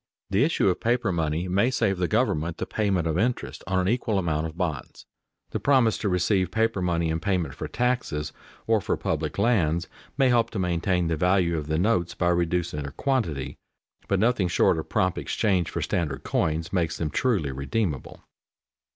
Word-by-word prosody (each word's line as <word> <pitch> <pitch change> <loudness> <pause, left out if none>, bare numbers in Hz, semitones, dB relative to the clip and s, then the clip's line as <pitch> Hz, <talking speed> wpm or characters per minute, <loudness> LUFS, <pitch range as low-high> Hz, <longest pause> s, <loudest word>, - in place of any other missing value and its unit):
The 100 +6 +3
issue 155 -8 +2
of 90 - +1
paper 120 -3 +1
money 80 +1 -1
may 100 +7 +2
save 110 -7 0
the 90 - +1
government 95 -8 0
the - - -3
payment 100 -6 0
of 80 +1 0
interest 100 - -2
on 95 -1 0
an 95 0 +1
equal 115 -1 0
amount 80 -3 0
of 80 +1 -10
bonds. 80 -8 -4 0.5
The - - -2
promise 130 -6 +3
to 105 - -1
receive 90 0 +1
paper 110 0 0
money 85 -2 0
in 80 - -1
payment 90 -2 -1
for - - -5
taxes 120 -12 -1 0.3
or 110 -2 +2
for - - -1
public - - -2
lands, 85 -8 +2 0.3
may 135 -2 +4
help 115 -2 +3
to 110 - -6
maintain 90 0 0
the 80 -1 0
value 90 0 +2
of 75 -2 -3
the 80 0 0
notes 90 -2 +1
by 85 - +1
reducing 85 -2 0
their 70 -1 -6
quantity, 95 - -1 0.5
but 100 - +1
nothing 110 -3 +2
short 85 0 +3
of 80 - -7
prompt 95 -1 +1
exchange 95 -6 0
for - - -3
standard 75 -6 -2
coins 80 +2 -1
makes 85 -3 0
them 75 -2 -2
truly 95 - +1
redeemable. 70 - -3
90 Hz, 185 wpm, -26 LUFS, 80-110 Hz, 0.5 s, may